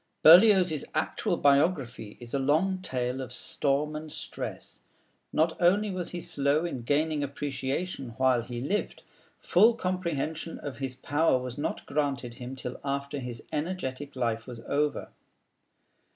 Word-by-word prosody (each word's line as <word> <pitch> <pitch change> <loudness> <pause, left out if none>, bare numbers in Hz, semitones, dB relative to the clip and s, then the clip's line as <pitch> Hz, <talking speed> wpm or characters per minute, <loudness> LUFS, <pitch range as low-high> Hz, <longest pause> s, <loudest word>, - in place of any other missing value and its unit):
Berlioz's 180 -3 +7
actual - - 0
biography 140 - +2
is 120 -1 -9
a 140 - +1
long 160 +8 +2
tale 125 -5 -2
of 130 - -6
storm 150 +2 0
and 155 0 -6
stress. 145 -2 -7 0.5
Not 160 +1 +2
only 200 +4 +4
was 185 -2 -3
he 175 - -5
slow 145 +3 +1
in 150 -8 -4
gaining 150 +4 +1
appreciation 140 -1 -3
while 130 -2 +3
he 120 0 -6
lived; 195 +11 -2 0.3
full 220 +6 +4
comprehension 170 -5 -2
of 145 -2 -7
his 135 -2 -3
power 145 +2 +2
was 125 -1 -5
not 145 - -3
granted 140 -5 -1
him 125 +1 -7
till 125 -1 -6
after 140 0 -2
his 125 -3 -6
energetic 150 -4 -3
life 115 -2 -1
was 120 -2 -7
over. 145 +4 -1
145 Hz, 140 wpm, -28 LUFS, 130-165 Hz, 0.5 s, Berlioz's